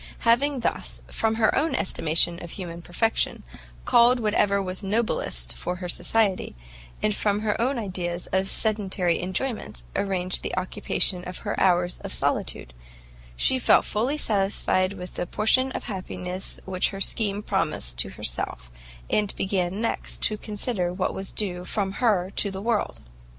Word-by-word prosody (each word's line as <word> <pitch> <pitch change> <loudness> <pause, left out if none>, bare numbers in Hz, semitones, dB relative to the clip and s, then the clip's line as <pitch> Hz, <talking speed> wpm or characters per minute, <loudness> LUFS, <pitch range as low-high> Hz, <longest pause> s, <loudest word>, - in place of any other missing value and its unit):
Having 255 +3 +3
thus, - - -2
from 225 0 +1
her 220 -1 +3
own 325 - +1
estimation 170 -1 +2
of 175 - -7
human 170 -2 -6
perfection, 225 +7 0 0.4
culled 240 +1 +5
whatever 210 -2 +2
was 185 -1 -3
noblest 195 - -1
for 180 - -3
her 180 0 -5
society, 200 - +1 0.5
and 210 -1 +2
from 205 0 +1
her 215 0 0
own 260 +3 +1
ideas 180 -5 -3
of 190 +1 +1
sedentary 195 -5 +1
enjoyments 185 - -3
arranged 185 -2 +2
the - - -4
occupations 185 0 0
of 180 - -5
her - - -1
hours 180 -1 +2
of - - -5
solitude, - - -1 0.6
she 260 - +3
felt - - +5
fully 245 +8 0
satisfied 195 -4 +1
with 180 -2 -8
the 175 - -3
portion 255 +7 +3
of - - -4
happiness 185 -3 -4
which 185 -1 +1
her 195 - -7
scheme 205 +1 +1
promised - - -1
to - - +3
herself, - - -3 0.4
and 210 -2 0
began 190 +1 -1
next 230 - -2
to 215 - +3
consider 210 -3 -1
what 185 +1 -1
was 190 0 -5
due 180 -4 -1
from 195 +1 -2
her 195 -4 +1
to 205 - +2
the 190 -1 -5
world. 220 +1 -1
195 Hz, 155 wpm, -25 LUFS, 180-220 Hz, 0.6 s, culled